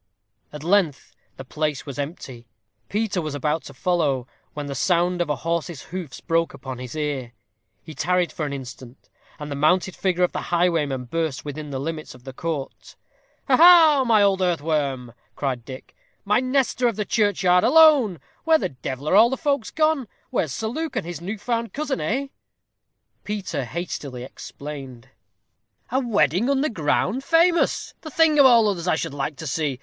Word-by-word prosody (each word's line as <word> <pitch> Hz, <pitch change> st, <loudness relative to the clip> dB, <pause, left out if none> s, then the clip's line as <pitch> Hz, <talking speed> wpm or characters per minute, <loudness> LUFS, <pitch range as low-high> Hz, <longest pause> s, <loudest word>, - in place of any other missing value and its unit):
At 150 Hz, 0 st, -9 dB
length 175 Hz, -5 st, +1 dB, 0.2 s
the 135 Hz, -, -8 dB
place 150 Hz, 0 st, -2 dB
was 140 Hz, -1 st, -7 dB
empty. 135 Hz, -5 st, -6 dB, 0.4 s
Peter 210 Hz, -3 st, -1 dB
was 155 Hz, -2 st, -4 dB
about 150 Hz, +2 st, -1 dB
to 140 Hz, -, -10 dB
follow, 145 Hz, -6 st, 0 dB, 0.3 s
when 145 Hz, -1 st, -4 dB
the 140 Hz, -, -5 dB
sound 175 Hz, +5 st, +1 dB
of 170 Hz, -, -1 dB
a 150 Hz, -, +1 dB
horse's 165 Hz, +2 st, -3 dB
hoofs 175 Hz, -9 st, -6 dB
broke 165 Hz, 0 st, 0 dB
upon 130 Hz, -2 st, -7 dB
his 125 Hz, +2 st, -7 dB
ear. 140 Hz, -6 st, -3 dB, 0.5 s
He 160 Hz, -, -10 dB
tarried 180 Hz, +2 st, 0 dB
for 155 Hz, -, -5 dB
an -, -, -5 dB
instant, 130 Hz, -2 st, -9 dB, 0.3 s
and 150 Hz, -1 st, -7 dB
the -, -, -2 dB
mounted 180 Hz, +6 st, +2 dB
figure 180 Hz, -2 st, 0 dB
of 180 Hz, -, +2 dB
the -, -, -4 dB
highwayman 165 Hz, -7 st, +1 dB
burst 160 Hz, +1 st, -3 dB
within 150 Hz, +1 st, -6 dB
the 135 Hz, -, -4 dB
limits 155 Hz, 0 st, -5 dB
of 125 Hz, -, -17 dB
the 130 Hz, 0 st, -9 dB
court. 155 Hz, -1 st, -5 dB, 0.5 s
"Ha, 265 Hz, -, +5 dB
ha! 305 Hz, -10 st, +7 dB
old 195 Hz, -1 st, +2 dB
earthworm," 145 Hz, -8 st, -1 dB, 0.2 s
cried 130 Hz, -4 st, -2 dB
Dick, 130 Hz, +2 st, -11 dB, 0.3 s
"my 210 Hz, +3 st, +3 dB
Nestor 255 Hz, -1 st, +1 dB
of 230 Hz, -, -1 dB
the 210 Hz, 0 st, -2 dB
churchyard, 185 Hz, -5 st, +2 dB
alone! 270 Hz, -, +5 dB, 0.2 s
Where 320 Hz, 0 st, +5 dB
the -, -, -2 dB
devil 130 Hz, +2 st, -6 dB
are 185 Hz, -, +3 dB
all 225 Hz, +3 st, +7 dB
the 265 Hz, -, -2 dB
folks 280 Hz, -6 st, -1 dB
gone? 310 Hz, -5 st, +1 dB, 0.2 s
Where's 155 Hz, -, 0 dB
Sir 220 Hz, -, -4 dB
Luke 315 Hz, +8 st, -4 dB
and -, -, -2 dB
his 170 Hz, -2 st, -6 dB
new 200 Hz, +5 st, -4 dB
found 230 Hz, +2 st, -3 dB
cousin, 290 Hz, -2 st, -2 dB
eh?" 270 Hz, +5 st, -1 dB, 0.9 s
Peter 195 Hz, -10 st, -3 dB
hastily 140 Hz, -4 st, -5 dB
explained. 135 Hz, -2 st, -9 dB, 0.8 s
"A 260 Hz, -, +2 dB
wedding 205 Hz, -, +1 dB
under 280 Hz, +2 st, +1 dB
ground? 190 Hz, -, 0 dB
famous! 335 Hz, +3 st, +2 dB
the 315 Hz, -, -8 dB
thing 310 Hz, 0 st, +3 dB
of 275 Hz, -, +9 dB
all 230 Hz, -3 st, +5 dB
others 185 Hz, -4 st, -2 dB
I 180 Hz, -, +3 dB
should 155 Hz, -, -4 dB
like 145 Hz, +2 st, -3 dB
to 160 Hz, -, -8 dB
see. 145 Hz, -2 st, -2 dB
170 Hz, 175 wpm, -23 LUFS, 140-225 Hz, 0.9 s, of